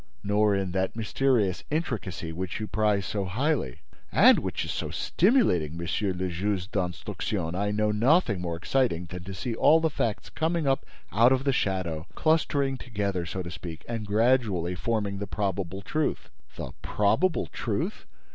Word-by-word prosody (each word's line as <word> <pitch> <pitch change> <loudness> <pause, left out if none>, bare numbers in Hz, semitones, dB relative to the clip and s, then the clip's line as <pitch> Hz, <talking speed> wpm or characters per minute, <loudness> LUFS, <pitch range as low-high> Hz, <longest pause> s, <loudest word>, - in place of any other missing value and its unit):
"Nor 105 0 +3
in 95 -2 -1
that 95 +2 -1
mysterious 115 -3 +1
intricacy 110 - -3
which 90 +1 -4
you 110 - -2
prize 105 -2 +1
so 100 0 -2
highly—" 120 - -1 0.3
"And - - +7
which - - -3
is - - -3
so - - -3
stimulating, 125 - +2
Monsieur 85 +4 -1
le 95 0 -2
Juge 95 +2 -2
d'Instruction! 90 -1 -2
I 100 +3 0
know 105 +1 +1
nothing 115 - +3
more 85 -2 -2
exciting 90 -1 0
than 90 +1 -8
to 95 0 -6
see 115 +6 -3
all 155 +8 +5
the 160 -1 +1
facts 115 -6 -2
coming 165 0 0
up 135 0 +1 0.2
out 115 +5 +5
of 130 0 +2
the 140 -1 +2
shadow, 90 -7 -1
clustering 145 -4 +1
together, 100 -8 -2
so 95 +1 -4
to 85 - -7
speak, 85 -2 -8
and 115 -3 -4
gradually 105 -5 +2
forming 100 0 -1
the 100 - -4
probable 95 -1 -2
truth." 155 +10 -2 0.2
"The - - -6
probable 105 - +1
truth! - - -3
100 Hz, 165 wpm, -27 LUFS, 90-125 Hz, 0.3 s, And